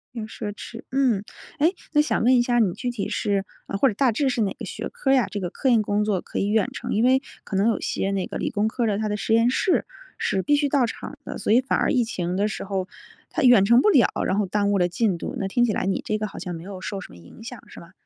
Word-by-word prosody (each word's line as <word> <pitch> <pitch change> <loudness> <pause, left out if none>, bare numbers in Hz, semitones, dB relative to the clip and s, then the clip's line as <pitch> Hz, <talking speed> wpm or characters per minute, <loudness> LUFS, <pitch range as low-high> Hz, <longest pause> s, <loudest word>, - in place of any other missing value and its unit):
很 220 -2 -4
奢 210 -1 -5
侈。 230 +2 -9
嗯， 250 -7 +2 0.4
诶， 335 +6 +3 0.2
那 295 - +5
想 300 - 0
问 255 +2 +5
一 - - +4
下， 240 0 +1
你 190 -6 +2
具 250 - -4
体 235 -4 -4
是 200 -1 -1 0.3
或 270 - +5
者 215 - 0
大 250 +3 +2
致 270 +4 +1
是 240 - -1
哪 200 -3 0
个 - - -5
学 - - -5
科 270 - -1
儿 - - +6
呀？ 250 -7 +3
这 205 - -4
个 180 -2 -3
科 265 - -1
研 230 -3 +5
工 205 0 0
作 195 -4 0
可 - - -5
以 200 - 0
远 210 -1 +2
程， - - -4
因 220 - +2
为 260 +1 +4 0.2
可 195 - -6
能 200 +4 +3
有 225 - 0
些 195 - -2
那 195 -2 -1
个 - - -5
理 - - -2
工 210 -1 0
科 235 +2 -2
儿 - - +2
的， 205 - 0
它 215 0 -1
的 210 - -1
实 220 - -1
验 230 +2 +4
室 360 +8 +1 0.3
是 190 - 0
必 290 +8 +2
须 290 -1 +1
到 270 -3 +3
场 - - -7
的， - - -6
所 - - -1
以 250 - +5
反 265 - 0
而 - - +1
疫 250 -3 +3
情 180 -5 -3
的 205 +2 +1
时 215 - -5
候 190 -1 -3 0.4
它 320 - -2
远 240 -6 +7
程 235 +4 +6
不 425 - +4
了， 265 - +5 0.2
然 190 - 0
后 210 - +2
耽 205 +1 0
误 200 - +2
了 175 -1 +3
进 190 0 0
度。 - - -5
那 195 - -2
听 240 +5 +2
起 215 - 0
来 - - -1
你 195 - 0
这 215 - 0
个 215 0 -3
好 - - -9
像 175 -2 -5
没 165 - -8
有 190 0 -8
受 195 0 -4
什 - - -10
么 - - -13
影 85 - -14
响， 240 0 -8
是 - - -12
吗？ 170 - -14
215 Hz, 325 characters per minute, -24 LUFS, 195-245 Hz, 0.4 s, 远